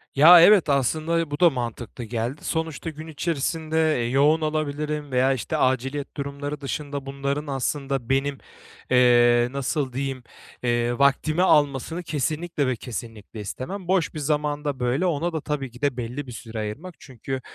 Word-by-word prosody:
Ya, 165 +5 +9
evet, 185 -2 +6
aslında 155 +4 +1
bu 145 - -3
da 175 -2 +7
mantıklı 120 -2 -5
geldi. 120 +4 -4
Sonuçta 160 -1 -3
gün 155 0 -9
içerisinde, 160 0 0
eee, 120 - -1
yoğun 145 +5 +3
olabilirim 150 -1 -2
veya, 130 +1 +3
işte, 130 - -3
aciliyet 135 +2 -1
durumları 145 +1 -5
dışında 140 0 -4
bunların 140 +2 -3
aslında 135 -2 -2
benim, 135 +1 +1 0.5
eee, 120 -1 +5
nasıl 140 0 -2
diyeyim, 135 -1 -3 0.4
eee, 120 +1 0
vaktimi 145 +4 +2
almasını 150 0 +2
kesinlikle 155 0 -2
ve 130 - 0
kesinlikle 115 -2 -8
istemem. 170 - -6
Boş 185 -4 +1
bir 155 - -5
zamanda, 150 -1 -1
böyle 125 +8 0
ona 170 0 0
da 160 - -2
tabii 140 -4 -3
ki 120 +3 -15
de 140 -3 0
belli 125 +4 -5
bir - - -8
süre 115 -1 -7
ayırmak 140 +13 -6
çünkü 130 0 -6
140 Hz, 155 wpm, -24 LUFS, 125-155 Hz, 0.5 s, Ya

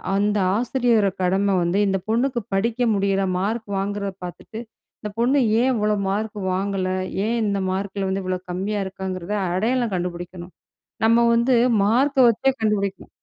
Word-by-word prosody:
அந்த 205 +1 +1 0.2
ஆசிரியரோட 235 -3 +2
கடமை 195 +2 +2
வந்து 175 +4 +1
இந்த 195 0 +1
பொண்ணுக்கு 240 +2 +1
படிக்க 225 +5 0 0.2
முடியல, 195 0 +1 0.2
மார்க் 220 +3 -2
வாங்குறத 200 0 -3
பார்த்துட்டு 215 +5 -9 0.4
இந்த 210 - -4
பொண்ணு 265 +4 +3 0.2
ஏன் 260 +1 +3
இவ்வளவு 210 -2 0
மார்க் 210 +1 -2
வாங்கல, 190 0 -1 0.4
ஏன் 235 +1 0
இந்த 200 -1 0
மார்க்ல 195 0 -3
வந்து 190 +1 -1
இவ்வளவு 185 0 -4
கம்மியா 200 +3 -2
இருக்காங்கறத 190 0 -5 0.2
அடையாளம் 230 +2 0
கண்டுபிடிக்கணும். 175 0 -5 0.5
நம்ம 230 +1 +5
வந்து 240 +2 +3 0.3
மார்க்க 260 +3 +4
வச்சே 270 +4 +1
கண்டுபிடிக்கணும் 200 -3 -1
205 Hz, 140 wpm, -22 LUFS, 190-230 Hz, 0.5 s, நம்ம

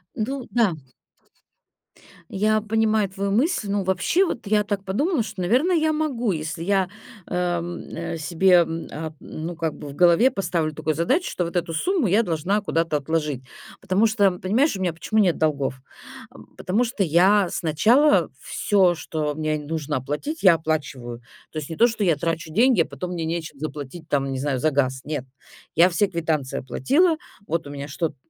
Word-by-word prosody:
Ну 255 +4 -3
да. 230 -7 +3 1.6
Я 215 +2 +1
понимаю 215 -1 +1
твою 195 +1 -3
мысль. 240 - +1
Ну, 200 0 0
вообще, 190 - +2
вот 240 - -5
я 210 0 +3
так 205 -1 -3
подумала, 270 - 0
что, 200 - -7
наверное, 255 - +2
я 315 -1 +2
могу, 260 -8 -1
если 160 0 -4
я, 190 0 +1 0.4
эм, 175 -1 -2 0.2
э 170 0 -4
себе 170 +4 +2
м 165 0 -5
а 155 +1 -5
ну, 165 +2 -6
как 165 -2 -2
бы 145 - -9
в 140 - -9
голове 180 - +5
поставлю 170 -5 -1
такую 155 +1 -2
задачу, 260 - +1
что 180 - -2
вот 170 - -7
эту 170 -1 -1
сумму 355 - +1
я 205 +5 +3
должна 180 +3 0
куда-то 165 -5 0
отложить. 150 -3 -2 0.4
Потому 195 +3 +2
что, 205 -3 +3
понимаешь, 210 - +1
у 190 - -6
меня 175 -3 0
почему 215 +6 -1
нет 185 -5 +3
долгов? 140 -4 -1 0.8
Потому 205 +7 0
что 230 -4 -1
я 185 +3 +4
сначала 230 - +3
всё, 190 -4 +2
что 155 -2 -3
мне 155 0 -1
нужно 150 -1 -3
оплатить, 150 - -4
я 185 -3 +7
оплачиваю. 140 -7 -3 0.3
То 155 - -4
есть 145 - -7
не 165 - -5
то, 235 - +6
что 225 -2 -2
я 170 -5 +3
трачу 165 0 -3
деньги, 235 -2 +4
а - - +1
потом 180 0 -6
мне 165 -2 -3
нечем 160 -3 -4
заплатить, 155 +1 -6
там, 135 -1 0
не 135 - -3
знаю, 135 -1 -1
за 155 +4 +2
газ. 130 -2 0
Нет, 145 -3 -4 0.5
я 170 +3 +6
все 200 +3 +1
квитанции 160 -6 -2
оплатила, 315 - +2 0.3
вот 165 -1 -2
у - - -8
меня 140 0 -6
что-то, 160 +2 -3
175 Hz, 180 wpm, -23 LUFS, 155-215 Hz, 1.6 s, я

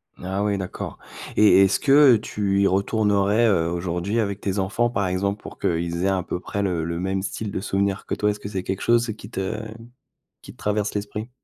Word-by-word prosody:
Ah 95 +2 -3
oui, 100 -1 0
d'accord. 95 -1 -6 0.4
Et, 105 -2 +6
est-ce 95 0 +2
que 140 -2 +6
tu 100 -2 -1
y 100 - +4
retournerais, 105 +2 +2
heu, 85 -6 +2
aujourd'hui 90 +5 -2
avec 100 -2 -2
tes 100 0 -2
enfants, 105 +5 +1
par 100 -5 -1
exemple, 100 +3 -1
pour - - -11
qu'ils 85 +2 -1
aient - - +3
à 95 -2 +1
peu 90 - -4
près 100 +2 -4
le 90 -4 -1
le 85 0 -3
même 95 +1 -1
style 105 +1 -4
de - - -3
souvenirs 100 0 -1
que - - -1
toi? 105 0 +1
Est-ce 105 - -7
que 100 - -7
c'est 95 -2 -3
quelque 95 +1 -3
chose 115 -1 +2
qui 105 -2 -11
te 110 0 -3 0.8
qui - - -11
te - - -24
traverse 105 0 -1
l'esprit? 105 +3 -4
100 Hz, 215 wpm, -23 LUFS, 95-105 Hz, 0.8 s, Et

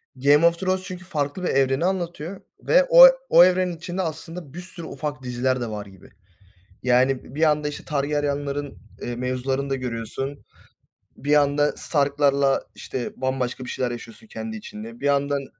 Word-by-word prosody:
Game 145 +5 +4
of 170 0 +3
Thrones, 185 0 0
çünkü 185 -1 -8
farklı 150 0 -3
bir - - 0
evreni 135 +4 +2
anlatıyor, 175 -1 -3 0.2
ve - - +5
o - - +11 0.2
o, - - +8
evrenin 180 -1 +2
içinde 175 +3 -4
aslında 165 -2 -6
bir 175 - -7
sürü 175 -2 -10
ufak 145 -4 -5
diziler 125 +1 -1
de 120 - -3
var 105 -1 -5
gibi. 95 -2 -16 0.7
Yani, 130 +1 +1
bir 155 - -3
anda, 150 0 0
işte, 145 - -8
Targaryen'lerin, 145 -1 -2 0.2
eee, 120 0 -4
mevzularını 130 +2 -2
da - - +1
görüyorsun. 130 +3 -5 0.7
Bir 145 +3 -3
yanda 145 0 +3
Stark'larla, 140 -2 +1
işte, 125 -2 -5
bambaşka 130 -1 -2
bir - - -7
şeyler 125 -2 -2
yaşıyorsun 120 - -10
kendi 220 +1 -6
içinde, 220 +2 -9
bir - - -5
yandan 140 -1 +1
145 Hz, 160 wpm, -23 LUFS, 130-175 Hz, 0.7 s, o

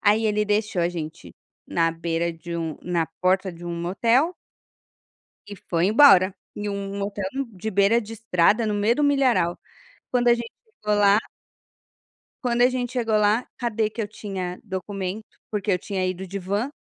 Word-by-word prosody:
aí 215 +2 +3
ele 210 0 +1
deixou 210 -2 0
a 170 - +2
gente 170 -1 -7 0.3
na 165 -1 +1
beira 165 +1 -2
de 170 +1 -7
um 160 -2 -3
na 170 -2 0
porta 185 +1 +2
de 170 +1 -11
um 170 - -4
motel 230 - +1 1.1
e 205 - -7
foi 170 0 +2
embora, 200 -5 +6 0.2
em 210 0 -3
um 200 0 -4
motel, 200 0 -3
hum, 270 -3 -2
de 215 +3 -5
beira 200 +4 +4
de 220 0 -9
estrada 220 0 +2
no 210 - 0
meio 210 +4 +2
do 295 - +2
milharal. 255 -11 +2 0.5
Quando 245 -1 +2
a 235 - +7
gente 235 -1 -5 0.3
chegou 210 0 +1
lá 200 0 +5 1.3
quando 240 -1 +2
a 250 - +7
gente 250 -1 -2
chegou 230 -3 0
lá, 210 +3 +2
cadê 225 -3 0
que 220 +1 -4
eu 205 - -4
tinha 190 -4 -5
documento, 195 0 -4 0.3
porque 205 -1 -2
eu 180 - +2
tinha 190 -1 -3
ido 185 +1 -3
de 195 +2 -5
van 205 +9 -2
205 Hz, 180 wpm, -24 LUFS, 180-225 Hz, 1.3 s, a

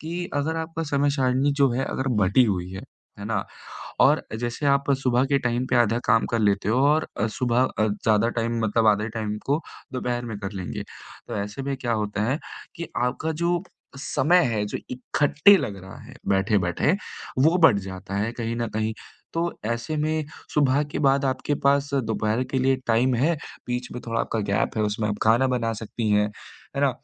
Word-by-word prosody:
कि 175 +2 -4
अगर 155 +3 0
आपका 165 0 -3
समय 140 0 +2
सारिणी 135 0 +2
जो 135 -2 +5
है 135 +2 0
अगर 135 0 -2
बँटी 100 +6 +4
हुई 90 -4 -1
है, 95 - -6 0.4
है 100 - -7
ना, 105 -2 -1 0.6
और - - +5 0.2
जैसे 120 +4 -2
आप 140 0 +2
सुबह 125 0 +3
के 140 0 +2
टाइम 125 0 -1
पे 125 - +3
आधा 120 -1 +3
काम 115 - +4
कर 115 - +1
लेते 100 -1 +1
हो 120 - +2
और 155 +2 +2
अ, - - +2
सुबह 120 +3 +1 0.2
अ, 110 - +3
ज़्यादा 105 +1 +2
टाइम 115 +1 -1
मतलब 110 +1 +2
आधे 105 +1 +2
टाइम 105 -1 -2
को 145 +4 +1 0.3
दोपहर 120 -1 -2
में 110 -3 -5
कर 100 0 -5
लेंगे। 95 -3 -5 0.5
तो - - -4
ऐसे 105 +7 -6
में 140 0 -2
क्या 120 -2 -2
होता 105 -1 -1
है 145 - 0 0.4
कि 170 -1 -5 0.2
आपका 155 +6 -1
जो 170 +2 0 0.4
समय 170 +5 +3
है 105 -1 0
जो - - -4
इकट्ठे 145 +9 +4
लग 100 - -3
रहा 95 - -10
है - - -13
बैठे-बैठे, 95 - +2 0.5
वो 160 +7 +5
बढ़ 140 -11 +6
जाता 95 +1 -7
है 105 +3 -1
कहीं 115 -1 -3
न 120 - -1
कहीं, 110 0 0 0.4
तो 170 +1 -1
ऐसे 120 +7 -2
में 155 0 0 0.3
सुबह 145 -1 +3
के - - -2
बाद 140 -1 +3
आपके 130 +2 0
पास 140 0 +3
दोपहर 110 -1 0
के 135 - 0
लिए 130 +1 +3
टाइम 120 +3 +3
है, 155 +8 +2 0.3
बीच 125 +1 -2
में 125 - -6
थोड़ा 115 0 0
आपका 115 - -2
गैप 100 +2 -1
है 110 - +2
उसमें 105 +1 -1
आप 105 - -1
खाना 115 +4 +4
बना 115 -3 0
सकती 110 +1 -4
हैं। 105 0 +3 0.5
है 140 - 0
ना? 140 - +4
120 Hz, 200 wpm, -24 LUFS, 110-140 Hz, 0.6 s, बढ़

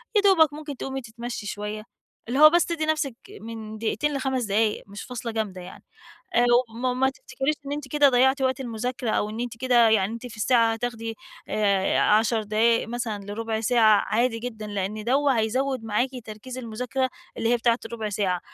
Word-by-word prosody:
يَا 415 - +5
دوبَك 335 -7 +5
ممكن 295 -2 -7
تقومي 270 +1 -4
تتَمشي 235 -1 -7
شُوَيّة، 210 +1 -5 0.4
اللي 255 +4 -1
هو 305 0 +10
بس 345 +2 +3
تَدّي 330 -2 -2
نَفسِك 305 -5 0 0.3
من 220 -1 -7
دقيقتين 260 +7 -1
ل5 265 -2 -1
دقايق 210 +1 +1
مش 200 +1 -8
فاصلة 245 -2 -5
جامدة 210 -5 -3
يعني. 180 +1 -11 0.5
آآ 240 +1 +5 0.2
وما 240 +3 -2
وما 260 +1 +2
تفتكريش 270 +2 -3
إن 280 - -5
أنتِ 290 -1 -4
كده 290 0 +4
ضَيَّعتِ 265 +2 +3
وقت 260 +1 +1
المُذاكَرة 245 0 -3
أو 210 - 0
إن 220 +2 -6
أنتِ 240 -1 -4
كده 240 -2 +4
يعني 215 -1 +2
أنتِ 235 +2 -7
في 230 -2 -11
الساعة 230 +1 +3
هَتاخدي 225 -1 -4 0.3
آآ 200 -2 +2
10 220 +1 +3
دقايق 220 +2 +2
مثلًا 225 -3 -4
لرُبَع 220 +2 -3
ساعة 220 -3 +4
عادي 230 +1 +1
جدًا، 220 -3 -6
لأن 205 +1 -3
دوّة 270 +2 +2
هَيَزَوَّد 255 +3 -1
معاكِ 225 +4 0 0.2
تركيز 225 +4 -8
المُذاكَرة 250 +2 -2 0.3
اللي 225 - 0
هي 240 - +3
بتاعة 235 0 +2
الرُبَع 225 -2 -4
ساعة، 195 -3 0
235 Hz, 185 wpm, -25 LUFS, 215-260 Hz, 0.5 s, هو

